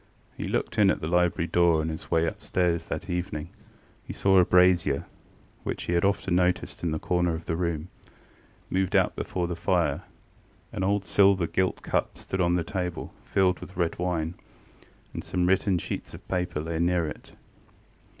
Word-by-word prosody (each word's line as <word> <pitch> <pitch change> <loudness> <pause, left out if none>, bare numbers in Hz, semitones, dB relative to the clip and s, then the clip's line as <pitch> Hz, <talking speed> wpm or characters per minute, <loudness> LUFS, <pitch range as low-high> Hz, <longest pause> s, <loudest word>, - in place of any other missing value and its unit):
He - - -4
looked - - -1
in 100 -2 +6
at - - +1
the 80 - -4
library 90 0 +2
door 85 -1 +3
on 80 +1 -1
his 80 - -6
way 85 -1 +3
upstairs 85 -1 -1
that 95 - -4
evening, 90 -3 -3 0.6
and - - -6
saw 95 -1 +4
a 90 - +6
brazier, 90 -6 +4 0.6
which - - -4
he 85 - -2
had 85 - +2
often 100 -2 +1
noticed 90 0 +1
in 85 - 0
the 80 - -1
corner 90 0 0
of 80 - -8
the 80 - -1
room, 85 -1 -2 0.8
moved 95 -1 0
out - - +3
before 90 -1 -2
the 85 0 -3
fire; 85 +1 +1 0.7
an 95 - -2
old 100 0 +1
silver 95 0 +4
gilt 90 +3 -1
cup - - -1
stood 95 - -3
on 85 0 +3
the 90 - +1
table, 90 0 -4
filled 90 -2 +2
with 90 - -11
red 85 -2 0
wine, 85 -2 -1 0.8
and - - -5
some 90 -1 0
written 95 0 +2
sheets - - -5
of - - -14
paper 90 -4 -1
lay 80 +1 -3
near 85 0 +2
it. 75 - -8
90 Hz, 180 wpm, -27 LUFS, 85-90 Hz, 0.8 s, in